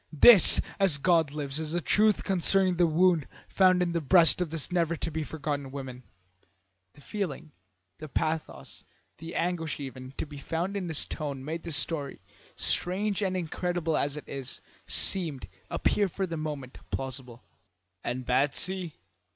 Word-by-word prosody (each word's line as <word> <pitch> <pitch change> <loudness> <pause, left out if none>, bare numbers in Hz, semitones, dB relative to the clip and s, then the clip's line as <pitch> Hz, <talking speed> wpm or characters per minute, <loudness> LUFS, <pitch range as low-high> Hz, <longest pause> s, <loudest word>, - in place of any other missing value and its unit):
"This, 185 +5 +9 0.2
as 190 -7 +4
God 165 0 +2
lives, 145 0 -4
is 160 0 -4
the 175 - 0
truth 210 +4 +2
concerning 190 -1 +2
the 175 -1 +4
wound 165 -1 +2 0.2
found 185 -2 +3
in 175 - -2
the 170 -1 -1
breast 170 +3 +5
of 175 - -1
this 160 +1 -4
never 170 -2 0
to 165 - -4
be 160 +1 -3
forgotten 145 -3 -4
woman." 130 -2 -8 0.9
The - - -17
feeling, 165 -5 -5 0.5
the 155 - -8
pathos, 155 - -4 0.4
the 165 +2 -8
anguish 165 -3 -2
even, 130 -1 -9
to - - -3
be 145 -2 -11
found 170 +7 -3
in 190 -3 -3
his 160 -3 -1
tone 140 -4 -6
made 160 +2 -4
this 160 -4 -1
story, 150 -3 -2 0.4
strange 200 +3 0
and 190 -2 -1
incredible 175 -1 -2
as 145 +1 -1
it 135 -3 -7 0.3
seemed, 160 -8 +2 0.2
appear 205 -1 +1
for 190 +2 -3
the 170 -2 -5
moment 150 -5 -6
plausible. 130 -2 -6 0.6
"And 125 +1 -4
Batsy?" 155 +7 0
160 Hz, 155 wpm, -28 LUFS, 140-180 Hz, 0.9 s, This